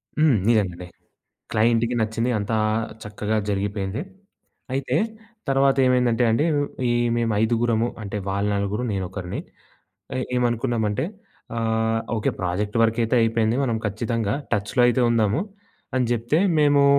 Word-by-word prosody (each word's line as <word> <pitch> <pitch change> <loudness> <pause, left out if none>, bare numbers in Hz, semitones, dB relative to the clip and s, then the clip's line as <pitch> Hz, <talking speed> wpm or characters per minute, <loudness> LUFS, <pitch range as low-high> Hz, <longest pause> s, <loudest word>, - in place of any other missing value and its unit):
హ్మ్. 150 -6 +4
నిజంగండి. 90 -6 +1 0.6
క్లయింట్‌కి 115 +2 +2
నచ్చింది 110 +2 0
అంతా 105 +2 -1 0.5
చక్కగా 105 +1 -2
జరిగిపోయింది. 100 +2 -2 0.7
అయితే, 135 -1 -1 0.5
తర్వాత 135 0 +3
ఏమైందంటే 125 -1 +3
అండి, 115 +8 +2 0.4
ఈ - - +3 0.3
మేము 115 -1 +1
ఐదుగురము 115 0 +2 0.2
అంటే, 100 +1 -4
వాళ్ళ 100 +1 0
నలుగురు 100 +4 -1
నేనొకరిని 95 -1 -4 0.8
ఏ - - 0 0.2
ఏమనుకున్నామంటే 120 -3 0 0.5
ఆహ్, 115 0 +1 0.2
ఓకే, 110 - 0
ప్రాజెక్ట్ 95 +3 -2
వర్కయితే 115 +1 +2
అయిపోయింది. 115 0 +2
మనం 120 -4 0
ఖచ్చితంగా 110 0 -1 0.2
టచ్‌లో 105 +5 +1
అయితే 120 +1 +2
ఉందాము 110 +1 +2 0.6
అని 130 -1 +2
జెప్తే, 120 +7 +1 0.2
మేమూ 145 -1 +5
115 Hz, 115 wpm, -23 LUFS, 105-120 Hz, 0.8 s, మేమూ